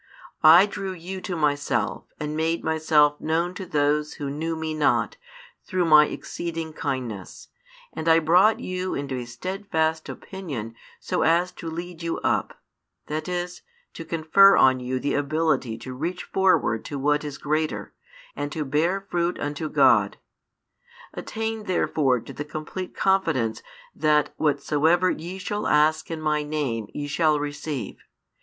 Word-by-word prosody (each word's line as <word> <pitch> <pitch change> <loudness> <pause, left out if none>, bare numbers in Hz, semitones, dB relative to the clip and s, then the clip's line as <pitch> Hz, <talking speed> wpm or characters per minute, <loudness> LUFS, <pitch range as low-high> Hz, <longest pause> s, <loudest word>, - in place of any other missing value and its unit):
I 170 +5 +8
drew 195 -2 -5
you 185 +2 -7
to 185 -1 -4
Myself 145 -3 0
and 150 0 -3
made 160 +1 0
Myself 155 -2 +3
known 165 +3 0
to 190 0 -7
those 150 0 +1
who 140 -2 -4
knew 160 +3 -3
Me 160 0 -3
not 155 -1 +1 0.5
through 185 -1 0
My 150 -2 +7
exceeding 165 -2 -5
kindness, 120 - -5 0.4
and 160 +1 -2
I 165 - +7
brought 180 +7 +4
you 185 0 -3
into 140 -1 -4
a 125 -1 -4
steadfast 160 - -2
opinion 140 - -6 0.3
so - - -2
as 170 +3 +3
to 170 -2 -7
lead 170 +1 -7
you 165 0 -2
up, - - -1 0.5
that 155 +1 -4
|409 - - -6
is, 180 0 -11 0.3
to 165 - -7
confer 165 +5 +5
on 130 -1 +5
you 125 +1 -2
the 140 - -1
ability 145 -5 0
to 130 +3 -8
reach 170 +8 -4
forward 185 - +2
to 145 - -5
what 150 +2 +1
is 145 -2 -6
greater, 155 +1 -2 0.4
and 145 +1 -4
to 155 -2 -3
bear 165 +8 +1
fruit 175 -2 -2
unto 145 +2 -3
God. - - +4 1.0
Attain 220 -1 -4
therefore 145 -8 +1
to - - -10
the 145 - -5
complete 155 +5 -6
confidence 135 - +1 0.3
that 150 -1 +2
whatsoever 155 +4 +2
ye 175 +4 -6
shall 205 +2 -3
ask 150 +1 +3
in 165 -1 -4
My 155 -1 0
name 145 -8 -2
ye 145 - -4
shall 150 +1 +2
receive. 145 -5 -5
155 Hz, 150 wpm, -24 LUFS, 145-175 Hz, 1.0 s, I